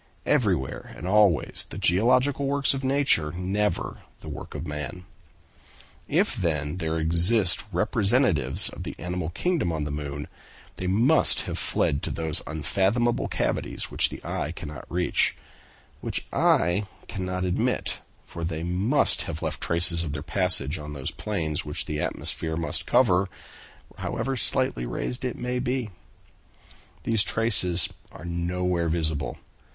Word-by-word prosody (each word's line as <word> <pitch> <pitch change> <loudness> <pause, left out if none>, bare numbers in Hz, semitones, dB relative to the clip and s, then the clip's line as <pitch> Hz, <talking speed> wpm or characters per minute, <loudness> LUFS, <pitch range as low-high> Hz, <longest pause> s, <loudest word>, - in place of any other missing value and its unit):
Everywhere 65 0 0
and 85 - -6
always 95 -7 +3
the - - -7
geological 125 +9 +3
works 140 0 +2
of 135 0 -4
nature, 130 - +2
never 95 +2 -1 0.2
the - - -8
work - - -8
of 75 +2 -4
man. 75 +4 -6 1.0
If, - - +1
then, 75 -1 -1
there 80 -2 -2
exist 85 +5 +3
representatives 100 - +2
of - - -9
the - - -6
animal 90 -1 -3
kingdom 160 - 0
on 80 -2 -2
the 75 - -4
moon, 75 0 -5 0.5
they 95 - -3
must 115 +12 +5
have - - -4
fled 70 - +1
to - - -2
those 80 -2 -2
unfathomable 100 - 0
cavities - - -2
which - - +4
the - - -8
eye 80 - -2
cannot 75 -6 -8
reach; 90 +1 +1 0.6
which - - -4
I 90 +5 +3 0.2
cannot 90 -1 -3
admit, 90 - 0 0.3
for 85 - -7
they 80 -1 -3
must 95 +11 +3
have 80 -1 -5
left - - -3
traces 85 0 +4
of 75 -3 -4
their 75 -1 -4
passage 90 -4 +2
on 75 0 -7
those 70 -2 -4
plains 80 -8 -2
which - - -2
the 75 0 -3
atmosphere 80 -1 -2
must 85 - -1
cover, 100 -7 +3 0.7
however 135 0 -2
slightly - - +1
raised 125 - -4
it 125 -2 -3
may 125 0 -2
be. 125 -3 -2 1.1
These 115 -2 +3
traces 95 -7 +2 0.2
are 85 - -11
nowhere 85 0 -1
visible. 80 -2 -1
90 Hz, 140 wpm, -26 LUFS, 80-105 Hz, 1.1 s, must